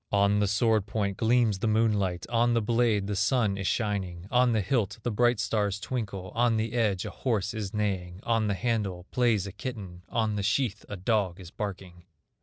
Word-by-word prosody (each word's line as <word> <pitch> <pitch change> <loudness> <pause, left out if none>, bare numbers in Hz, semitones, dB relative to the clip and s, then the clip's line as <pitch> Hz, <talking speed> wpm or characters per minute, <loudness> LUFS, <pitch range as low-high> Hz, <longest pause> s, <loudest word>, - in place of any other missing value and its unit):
On 100 0 +3
the 105 - +2
sword 105 0 +2
point 100 -3 -2
gleams 115 -3 +2
the 110 - 0
moonlight, 105 -5 +1
On 120 0 +2
the 115 - +2
blade 115 -3 +2
the 105 0 -2
sun 105 0 +2
is 100 -1 -3
shining, 95 -6 -2
On 125 0 +4
the 110 -2 +2
hilt 110 -1 0
the 120 - -1
bright 120 +1 +2
stars 105 -1 0
twinkle, 100 -6 -4
On 115 -1 +2
the 110 +1 -2
edge 105 -6 +1
a - - -5
horse 105 -6 -1
is 105 -3 -4
neighing, 95 -4 -2
On 115 -2 +1
the 100 - 0
handle 100 -6 -2
plays 115 -6 +2
a 100 - -6
kitten, 100 -5 -7
On 110 -2 0
the - - -1
sheath 105 +1 0
a 105 - -5
dog 95 -2 0
is 90 -2 -10
barking. 90 -4 -6
105 Hz, 200 wpm, -28 LUFS, 95-115 Hz, -, On